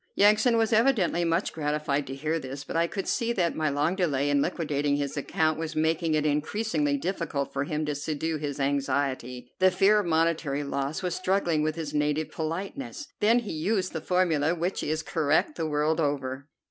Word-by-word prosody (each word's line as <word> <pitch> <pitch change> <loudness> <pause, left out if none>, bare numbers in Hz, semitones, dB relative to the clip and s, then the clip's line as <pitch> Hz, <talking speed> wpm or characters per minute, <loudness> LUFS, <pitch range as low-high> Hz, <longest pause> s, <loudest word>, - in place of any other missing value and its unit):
Yansan 215 +4 +5
was 225 0 +2
evidently 220 -7 +3
much 165 +3 0
gratified 150 -2 -1
to 135 - -5
hear 155 +4 -1
this, 135 0 -7
but - - -7
I 165 +1 +3
could 195 +2 -4
see 235 0 0
that 175 -6 0
my 155 -1 0
long 145 +5 0
delay 145 -6 +1
in 140 -1 +3
liquidating 145 -4 0
his 145 -1 -2
account 155 +2 0
was 160 -1 -4
making 160 +1 +1
it 155 0 +1
increasingly 150 0 0
difficult 165 -4 -3
for 140 +1 -1
him 155 +1 -2
to 150 - -1
subdue 155 +2 -2
his 145 -1 -4
anxiety. 135 -3 -1
The 185 0 +6
fear 195 +3 +4
of 200 - -2
monetary 160 -3 +1
loss 140 +3 -3
was 180 -1 -1
struggling 185 -4 +1
with 155 0 0
his 155 -3 -5
native 150 +1 0
politeness. 195 - -5
Then 225 +3 +4
he 235 -4 -2
used 185 +4 -1
the 160 - -3
formula 170 -3 +1
which 175 +3 -2
is 155 +1 -2
correct 160 - +1
the 160 - -2
world 150 +2 +1
over. 140 -2 -2
155 Hz, 190 wpm, -27 LUFS, 145-180 Hz, -, The